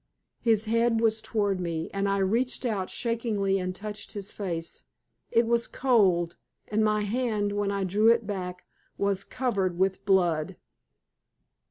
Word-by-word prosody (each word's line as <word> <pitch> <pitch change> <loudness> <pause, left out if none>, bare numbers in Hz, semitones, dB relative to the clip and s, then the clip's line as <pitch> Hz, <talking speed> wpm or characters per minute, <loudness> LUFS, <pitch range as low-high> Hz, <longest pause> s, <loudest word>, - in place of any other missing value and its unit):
His 225 -2 +2
head 230 +1 +2
was 220 -1 +2
toward 205 -4 0
me, 165 -2 -2
and 200 0 0
I 200 - +1
reached 230 +7 0
out 200 -6 -1
shakingly 220 -5 0
and 185 0 -3
touched 210 +1 -7
his 205 -1 -6
face. 170 -5 -5 0.5
It 230 +1 +3
was 235 0 +1
cold, 190 -10 +2 0.3
and 215 +1 +1
my 215 0 +2
hand, 210 -1 0
when 205 0 0
I 200 -1 -1
drew 205 +4 +2
it 230 -1 +3
back, 185 -3 -5 0.3
was 200 -1 0
covered 195 -10 -1
with 190 +1 +1
blood. 175 -6 +2
205 Hz, 150 wpm, -27 LUFS, 190-225 Hz, 0.5 s, It